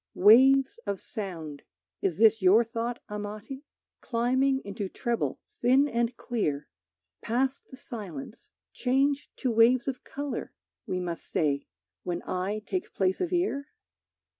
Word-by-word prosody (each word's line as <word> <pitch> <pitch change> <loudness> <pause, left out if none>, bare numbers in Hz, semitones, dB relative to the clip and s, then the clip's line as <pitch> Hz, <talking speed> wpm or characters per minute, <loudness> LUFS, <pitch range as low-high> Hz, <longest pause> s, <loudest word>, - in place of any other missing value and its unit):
Waves 265 +7 +6
of 200 -2 -1
sound 165 - -6 0.4
(Is 180 -4 0
this 220 0 +5
your 195 +5 +6
thought, 235 +1 -4
Amati?), 210 +6 -6 0.4
Climbing 260 +3 +1
into 200 -1 -4
treble 235 +3 -2
thin 260 +4 +3
and 235 -2 -1
clear, 150 -12 -2 0.5
Past 260 +4 -1
the 260 - -11
silence, 210 - -8 0.2
change 275 +3 +1
to 255 - -1
waves 235 +3 +4
of 265 -2 -3
color, 285 0 -5 0.3
We 185 - -1
must 175 -2 -5
say, 140 -3 0 0.3
when 175 -1 -3
eye 195 +4 -2
takes 370 - -3
place 190 -1 0
of 365 - -1
ear? 345 -6 0
230 Hz, 130 wpm, -28 LUFS, 195-265 Hz, 0.5 s, Waves